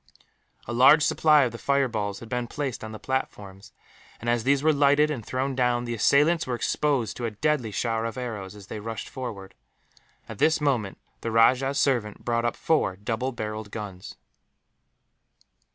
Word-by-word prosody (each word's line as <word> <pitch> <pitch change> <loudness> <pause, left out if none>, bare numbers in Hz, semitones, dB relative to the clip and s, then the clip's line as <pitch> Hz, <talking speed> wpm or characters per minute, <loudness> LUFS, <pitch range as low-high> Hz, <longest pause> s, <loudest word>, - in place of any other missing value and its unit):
A 120 - -5
large 140 +5 +6
supply 150 -2 +4
of 125 - -1
the 115 - -9
fireballs 115 -8 -1
had 115 - -9
been 125 0 -3
placed 135 -2 -4
on 110 - -6
the 110 - -7
platforms 100 -7 -5 0.5
and, 120 +1 -1
as 120 -1 +1
these 140 +2 +2
were 155 0 +4
lighted 145 +1 +3
and 125 -7 -4
thrown 130 +4 -2
down, 125 -1 +1
the 120 - -3
assailants 145 +8 +3
were 125 - -1
exposed 125 -2 0
to 120 - -3
a - - 0
deadly 120 +2 -1
shower 115 +2 -1
of 115 0 -5
arrows 105 -6 -5
as 100 -2 -12
they 105 - -7
rushed 115 +1 -6
forward. 110 -7 -7 0.7
At 110 - -9
this 160 0 +3
moment 125 -10 0 0.2
the 115 - -3
rajah's 130 +5 +3
servant 115 -6 0
brought 115 0 0
up 120 - 0
four 155 -12 +1
double 115 +6 -3
barrelled 110 -2 -5
guns. 100 -4 -8
120 Hz, 175 wpm, -26 LUFS, 110-135 Hz, 0.7 s, large